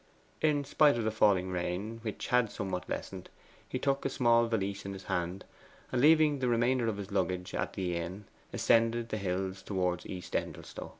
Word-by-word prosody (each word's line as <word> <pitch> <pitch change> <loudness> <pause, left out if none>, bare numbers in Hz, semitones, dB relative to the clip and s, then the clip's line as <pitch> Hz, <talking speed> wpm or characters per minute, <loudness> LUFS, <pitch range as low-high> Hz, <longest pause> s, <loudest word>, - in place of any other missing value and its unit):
In 150 -2 +2
spite 145 -1 +4
of 115 - -1
the 110 - 0
falling 95 -4 +3
rain, 90 +5 -3
which 110 -2 -5
had 125 -3 +3
somewhat 90 -3 -4
lessened, 95 -2 -5 0.4
he - - -2
took 140 0 0
a - - 0
small 120 -2 +3
valise 100 -3 -2
in 100 - -5
his 95 0 -9
hand, 90 0 -3 0.5
and, 125 - +1
leaving 155 -1 +5
the 130 - 0
remainder 120 +1 +2
of 110 -2 -1
his 100 0 -7
luggage 90 -2 -1
at - - -2
the 90 -2 -2
inn, 90 +5 -5 0.3
ascended 115 0 +2
the 110 - -2
hills 95 0 -2
towards 90 -3 -1
East 90 -2 -7
Endelstow. - - -4
105 Hz, 185 wpm, -31 LUFS, 95-120 Hz, 0.5 s, leaving